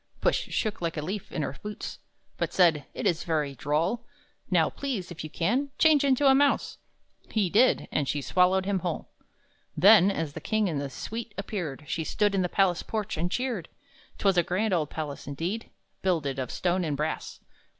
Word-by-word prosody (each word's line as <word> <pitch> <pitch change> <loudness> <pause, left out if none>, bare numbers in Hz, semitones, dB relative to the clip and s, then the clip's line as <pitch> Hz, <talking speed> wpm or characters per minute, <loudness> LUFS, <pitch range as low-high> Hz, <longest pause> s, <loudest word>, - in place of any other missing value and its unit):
Puss - - +3
shook 215 -4 -2
like 165 -1 -2
a - - -1
leaf, 190 +4 -5
in 155 - -2
her 140 - -4
boots, 210 0 -6 0.4
But - - -1
said, 165 -6 +4
"It - - -4
is 170 0 +1
very 150 -4 -1
droll! 165 - 0 0.5
Now, 170 -4 +4
please, 235 -11 -4
if 170 - -7
you 155 - -6
can, 245 - 0
change 310 -3 +5
into 275 0 +3
a 270 - +7
mouse!" 280 +1 +2 0.5
He 205 -6 0
did. 245 +5 +4
And 145 -3 0
she 145 - 0
swallowed 185 +5 +3
him 195 -1 0
whole! 175 -3 -4 0.7
Then, 195 +3 +7
as 160 -7 -2
the - - -7
king 215 -2 +1
and 150 -5 -1
his 140 -2 -5
suite 225 -1 -6
appeared, 175 -8 -4
She 160 +2 -2
stood 205 +5 +1
on 195 - +2
the 180 - 0
palace 185 -3 +2
porch 215 -3 -3
and 170 +2 -1
cheered. 245 -9 -2 0.5
'Twas 195 -2 +2
a - - +7
grand 190 +4 0
old 155 -4 +1
palace 150 -4 -5
indeed, 170 +11 -3 0.3
Builded 155 -8 0
of 130 - -3
stone 180 0 0
and 150 -4 -1
brass. 150 +2 -3
180 Hz, 190 wpm, -27 LUFS, 155-210 Hz, 0.7 s, a